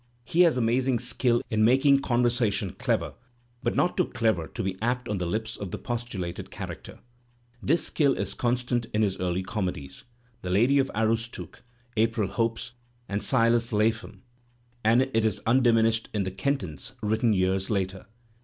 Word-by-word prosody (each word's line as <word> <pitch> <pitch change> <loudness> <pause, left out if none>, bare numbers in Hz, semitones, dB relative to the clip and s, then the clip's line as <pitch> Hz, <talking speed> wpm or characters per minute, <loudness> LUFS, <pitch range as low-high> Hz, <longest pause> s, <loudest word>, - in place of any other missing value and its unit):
He 165 +9 +2
has 170 -6 +5
amazing 125 +2 +2
skill 120 0 +1
in 110 -1 +2
making 135 +4 +5
conversation 120 -6 +1
clever, - - -1 0.5
but - - -1
not 180 - +1
too 180 - +2
clever 110 -10 0
to - - -5
be 95 -1 -2
ap 125 +2 -1
t - - -5
on 100 - -1
the 90 - -2
lips 110 +4 -3
of 100 - -5
tne - - -7
po 120 - -1
stulated 95 -8 -6
character. - - -8 0.6
This 165 +5 +2
skill 140 -4 +2
is - - -1
constant 120 -1 0
in 110 - +3
his 100 -3 0
early 90 0 -1
comedies, 90 -8 -4 0.4
"The 90 - -5
Lady 120 +10 +4
of 135 - +2
the - - -10
Aroostook," 115 +1 -2 0.3
"April 110 -2 +1
Hopes" 115 +2 -2 0.4
and 100 +1 -2
"Silas 115 +1 +2
Lapham" 110 +2 -1 0.6
and 115 +4 +4
it 130 -4 0
is 110 -3 0
undiminished 115 -2 +3
in 100 - +1
"The 95 - -3
Kentons," 95 - -3
written 110 +2 +2
years 95 -1 +1
later. 95 -2 -2
115 Hz, 170 wpm, -27 LUFS, 100-125 Hz, 0.6 s, has